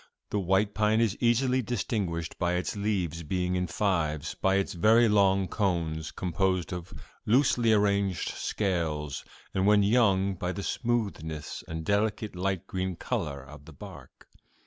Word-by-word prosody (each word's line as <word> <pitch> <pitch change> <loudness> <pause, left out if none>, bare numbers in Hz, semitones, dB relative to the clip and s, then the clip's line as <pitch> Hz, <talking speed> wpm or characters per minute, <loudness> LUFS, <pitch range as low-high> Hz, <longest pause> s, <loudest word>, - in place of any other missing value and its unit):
The 105 - 0
white 95 +2 +1
pine 110 +1 +2
is 115 -4 +2
easily 125 +2 +2
distinguished 100 -8 -3
by 90 0 +1
its 90 +3 -2
leaves 95 -6 -1
being 90 +3 -1
in 90 0 0
fives, 80 -6 -1
by 95 0 +1
its 100 0 0
very 110 +7 +5
long 100 -2 +3
cones, 85 -6 -1
composed 95 +1 -1
of 90 -1 -6 0.4
loosely 120 -1 +3
arranged 100 -4 +1
scales, 80 -8 -2 0.3
and 95 +1 +1
when 105 -1 +5
young 100 -3 +3
by 90 0 -3
the 100 - -5
smoothness 100 - -3
and 80 0 -5
delicate 105 +1 0
light 95 0 -2
green 95 -1 -3
color 80 - -3
of 70 +1 -13
the 80 - -12
bark. - - -12
95 Hz, 145 wpm, -28 LUFS, 85-105 Hz, 0.4 s, very